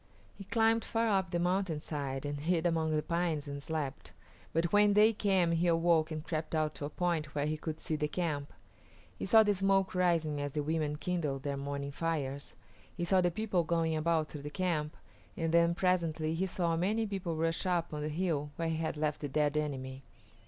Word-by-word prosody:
He 195 - -10
climbed 225 +2 +2
far 225 0 0
up 190 -3 +1
the 175 - -1
mountainside 155 -7 -1
and 145 0 -3
hid 165 +2 0
among 160 -2 +1
the 150 - 0
pines 170 -3 -1
and 140 0 -5
slept, 150 -3 -4 0.4
but 165 +2 0
when 205 0 +5
day 215 +2 +6
came 190 -5 +2
he 170 +1 +1
awoke 165 -1 +3
and 155 -1 -5
crept 160 0 -3
out 155 -1 +1
to 145 - -5
a - - -4
point 160 -2 -2
where 145 0 0
he 155 +1 0
could 155 0 -5
see 155 - -2
the 150 0 0
camp. 150 -3 -2 0.7
He - - -3
saw 220 -2 +7
the 205 -1 +2
smoke 195 0 +2
rising 165 -5 +1
as 145 -1 -3
the 150 - -1
women 155 -1 -1
kindled 150 -5 -2
their 140 -1 -2
morning 140 0 -4
fires; 140 -3 -3 0.4
he 175 - -1
saw 185 +1 +4
the 175 - +3
people 185 -1 0
going 165 -1 0
about 160 0 +1
through 150 - -7
the 145 - -6
camp, 155 -3 -2 0.4
and 165 -1 0
then 170 0 +4
presently 170 -4 +1
he 185 +4 0
saw 175 -3 0
many 210 +7 +1
people 190 -5 -3
rush 165 +3 0
up 170 -3 0
on 150 - -3
the 150 - -2
hill 155 -3 -1
where 165 -1 -1
he 160 - -1
had 160 -1 -2
left 150 -1 -1
the 145 - -3
dead 150 +1 +1
enemy. 135 -3 -3
165 Hz, 210 wpm, -32 LUFS, 150-180 Hz, 0.7 s, saw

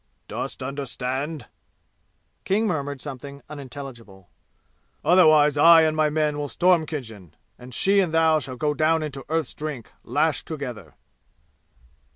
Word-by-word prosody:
"Dost - - -5
understand?" 135 +1 -4 1.0
King 210 +4 +1
murmured 145 -8 -2
something 140 0 -8
unintelligible. 125 -9 -10 0.7
"Otherwise, 155 -4 +5
I 165 +2 +8
and 155 0 +1
my 155 -1 +2
men 150 -1 0
will 145 - -2
storm 170 +4 +2
Khinjan, 110 - -8 0.2
and 125 +1 -11
she 195 +10 +2
and 180 -4 +1
thou 160 -1 +3
shall 130 -2 -7
go 150 +2 0
down 155 +1 +2
into 140 -3 -6
Earth's 160 -3 -1
Drink 150 -7 -6
lashed 150 +5 0
together!" 125 - -7
145 Hz, 130 wpm, -24 LUFS, 130-160 Hz, 1.0 s, I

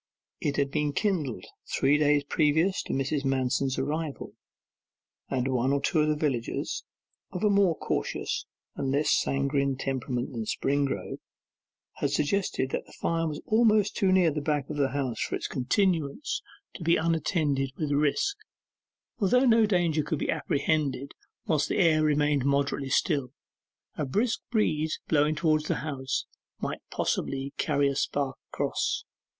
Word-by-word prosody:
It 145 - -1
had 140 -1 +1
been 150 -1 0
kindled 150 - -1 0.3
three 145 +2 +3
days 145 -1 +3
previous 160 +6 +2
to - - -5
Mrs. 135 +1 -1
Manston's 135 0 0
arrival, 150 +2 -3 1.0
and 130 -1 0
one 130 0 +1
or 140 - +2
two 155 +1 +2
villagers, 140 -6 -2 0.5
of 180 - -4
a 210 - +4
more 195 -4 +4
cautious - - -2 0.3
and 135 - -2
less 145 +2 +2
sanguine 140 0 +1
temperament 130 -1 -2
than 115 -3 -4
Springrove, 140 0 -1 0.8
had 145 - 0
suggested 145 -2 0
that - - -3
the - - -16
fire 165 0 -1
was 150 -2 -5
almost 215 -2 +3
too 190 -2 +2
near 180 -3 +4
the 150 0 -3
back 145 -1 -1
of 150 - -4
the 140 -2 +2
house 130 -4 -2
for - - -1
its - - -4
continuance 165 - 0 0.3
to 175 - -8
be 170 +1 +4
unattended 155 -4 0
with 150 -2 -2
risk; 150 - +1 0.8
for 200 - +2
though 250 +4 +4
no 225 -3 +5
danger 175 -6 +2
could 155 +1 -2
be - - -1
apprehended 140 -3 0 0.3
whilst 155 -3 +1
the - - 0
air 165 -5 +4
remained 150 -2 +2
moderately 140 0 0
still, 140 -2 +1 0.7
a 150 - +1
brisk 220 - 0
breeze 160 -9 0
blowing 150 0 +3
towards 155 -1 +2
the - - 0
house 135 -3 -2 0.3
might - - -4
possibly 135 +1 -2
carry 145 -2 +2
a 140 - -1
spark 140 -1 -1
across. - - -1
145 Hz, 150 wpm, -28 LUFS, 135-165 Hz, 1.0 s, no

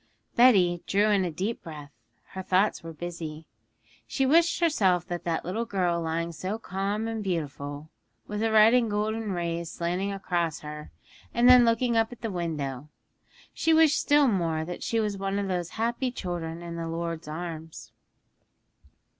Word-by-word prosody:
_' - - -38
Betty 190 -9 +5
drew 205 +2 +3
a 190 -3 +2
deep 190 +8 -3
breath; 150 -4 -9 0.4
her 190 - -6
thoughts 190 +3 +1
were 165 - -8
busy. 160 -1 -7 0.6
She 270 - 0
wished 335 +5 +4
herself 195 - +2
that 175 -2 -3
little 215 +7 -2
girl 180 -5 0
lying 165 +1 -2
so 185 +6 -4
calm 205 +1 -3
and 225 -1 -3
beautiful, 150 -4 -4 0.3
with 210 0 -5
the 225 0 +1
red 220 +1 +7
and 245 -3 +3
golden 215 +1 -1
rays 170 -2 -2
slanting 180 +4 -2
across 175 -5 -2
her; 150 0 -8 0.5
and 240 +1 +4
then 250 -1 +8
looking 230 +1 +2
up 225 +1 +2
at 245 - -11
the 225 -2 -3
window, 150 -6 -4 0.6
she 325 0 +2
wished 320 -2 +5
still 290 -1 +4
more 165 -7 0
that 175 +1 -6
she 230 - 0
was 210 -3 -1
one 195 0 -1
of 200 -1 -1
those 180 -2 -2
happy 235 +3 0
children 175 -7 -5
in 170 0 -6
the 165 0 -4
Lord's 165 -1 -4
arms. 155 -8 -7
185 Hz, 165 wpm, -27 LUFS, 165-220 Hz, 0.6 s, then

